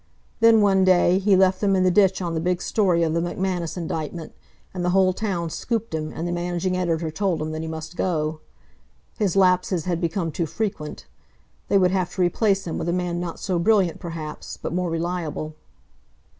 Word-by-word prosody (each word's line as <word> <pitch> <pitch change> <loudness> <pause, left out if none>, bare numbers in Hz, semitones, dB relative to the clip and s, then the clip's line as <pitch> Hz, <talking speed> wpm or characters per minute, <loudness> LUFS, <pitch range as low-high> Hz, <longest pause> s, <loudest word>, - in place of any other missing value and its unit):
Then, 225 -1 +6
one 195 -2 +4
day, 185 0 +4
he 195 0 +4
left 185 0 +3
them 200 -2 +3
in 185 - +2
the 185 - +4
ditch 190 0 +3
on 170 -1 -2
the 160 - -1
big 180 +2 0
story 180 -6 +1
of 160 -1 0
the 170 - +1
McManus 175 0 -2
indictment, 160 -1 -4 0.4
and 180 -1 -3
the 180 - +1
whole 185 0 +3
town 180 -5 -2
scooped 230 0 -3
him, 155 -1 -3
and 165 +2 -4
the - - -2
managing 175 +1 -1
editor 165 -3 -1
told 180 0 -1
him 155 0 -3
that 155 0 -4
he 160 - -5
must 160 +1 -6
go. 155 -4 -1 0.8
His 200 -5 +1
lapses 180 -3 +2
had 175 -2 -1
become 170 0 -1
too 165 +2 -2
frequent. 190 -5 -4 0.6
They 200 - +3
would 180 -2 +3
have 185 -2 0
to 185 - -1
replace 195 +2 +1
him 165 - -3
with 170 - -2
a - - +2
man 175 -1 -1
not 175 -1 -5
so 185 -3 -1
brilliant, 190 -2 +2
perhaps, 165 -3 -7
but - - -5
more 180 0 -1
reliable. 165 -2 -3
175 Hz, 200 wpm, -23 LUFS, 165-190 Hz, 0.8 s, Then